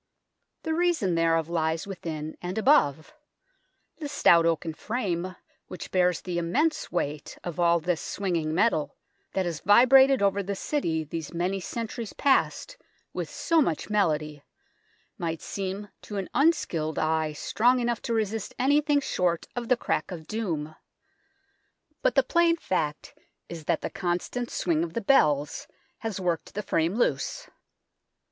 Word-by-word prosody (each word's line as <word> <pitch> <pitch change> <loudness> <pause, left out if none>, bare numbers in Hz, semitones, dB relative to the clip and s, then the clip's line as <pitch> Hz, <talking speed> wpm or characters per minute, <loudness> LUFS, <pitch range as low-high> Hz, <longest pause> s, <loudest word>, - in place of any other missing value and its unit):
The 320 - -1
reason 330 - +1
thereof 165 -1 +2
lies 160 -1 -1
within 160 -5 -5
and 180 +3 -4
above. 215 - +3 0.8
The 305 - -5
stout 170 -12 +4
oaken 165 0 -1
frame 185 -2 -3 0.3
which 185 - -8
bears 180 -2 +2
the 175 -2 -3
immense 300 - 0
weight 150 -4 -3
of 175 0 -5
all 170 0 +4
this 175 0 -1
swinging 170 -6 -2
metal, 170 -2 +1 0.4
that 190 - 0
has 170 -3 -3
vibrated 255 +4 +6
over 200 0 +2
the 200 +1 -3
City 170 - -1
these 160 +2 -6
many 185 +3 0
centuries 230 +3 -5
past 285 - +1 0.4
with - - -4
so 330 -1 +2
much 170 - -1
melody, 155 -7 0 0.8
might 165 -2 -2
seem 195 +1 -5
to 205 - -7
an 195 - -4
unskilled 240 - +1
eye 155 -1 0
strong 245 +11 +2
enough 240 -1 -1
to 235 - -2
resist 220 -1 -2
anything 290 +2 +3
short 175 -9 0
of 240 -1 -3
the 250 - +4
crack - - -1
of 170 -4 -7
doom. 160 -7 -3 1.3
But - - +2
the - - +5
plain 340 -1 +3
fact 155 - -2 0.4
is 165 -3 -8
that - - 0
the - - -4
constant 195 +6 -2
swing 165 -2 0
of 165 -1 -5
the 230 - -2
bells 150 - +2 0.3
has 220 -4 -4
worked 175 -2 -2
the 210 - -2
frame 165 +2 0
loose. - - -1
185 Hz, 145 wpm, -27 LUFS, 165-235 Hz, 1.3 s, vibrated